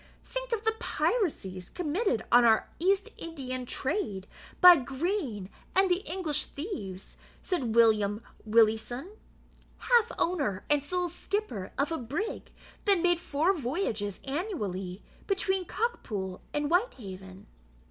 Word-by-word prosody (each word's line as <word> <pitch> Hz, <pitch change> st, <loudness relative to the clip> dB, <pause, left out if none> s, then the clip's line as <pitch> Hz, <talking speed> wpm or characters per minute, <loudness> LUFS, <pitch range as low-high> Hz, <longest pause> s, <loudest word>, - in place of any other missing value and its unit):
"Think -, -, -5 dB
of 450 Hz, -1 st, -1 dB
the 445 Hz, -, +3 dB
piracies 195 Hz, -, -1 dB
committed 335 Hz, -, 0 dB
on 245 Hz, 0 st, +7 dB
our 225 Hz, -2 st, +4 dB
East 390 Hz, +5 st, +2 dB
Indian 255 Hz, -6 st, -5 dB
trade 260 Hz, -, -2 dB, 0.3 s
by 360 Hz, -1 st, +11 dB
Green 270 Hz, -, -2 dB, 0.3 s
and 385 Hz, -1 st, +4 dB
the 355 Hz, +2 st, +2 dB
English 320 Hz, -5 st, 0 dB
thieves," 205 Hz, -, -7 dB, 0.3 s
said 255 Hz, -, -1 dB
William 215 Hz, -2 st, +4 dB, 0.2 s
Willieson, 225 Hz, -, +2 dB, 0.7 s
half 475 Hz, -2 st, +3 dB
owner 280 Hz, -, 0 dB
and 295 Hz, -1 st, +4 dB
sole 360 Hz, +5 st, -1 dB
skipper 350 Hz, -, -3 dB
of 280 Hz, +4 st, +1 dB
a 325 Hz, -, -1 dB
brig 310 Hz, -, -4 dB, 0.3 s
that 400 Hz, -3 st, +4 dB
made 350 Hz, 0 st, +3 dB
four 330 Hz, +3 st, +1 dB
voyages 240 Hz, -, -2 dB
annually 210 Hz, -, -3 dB, 0.2 s
between 385 Hz, -1 st, 0 dB
Cockpool 215 Hz, -, -3 dB
and 295 Hz, 0 st, -1 dB
Whitehaven. 195 Hz, -, -2 dB
290 Hz, 120 wpm, -29 LUFS, -, 0.7 s, by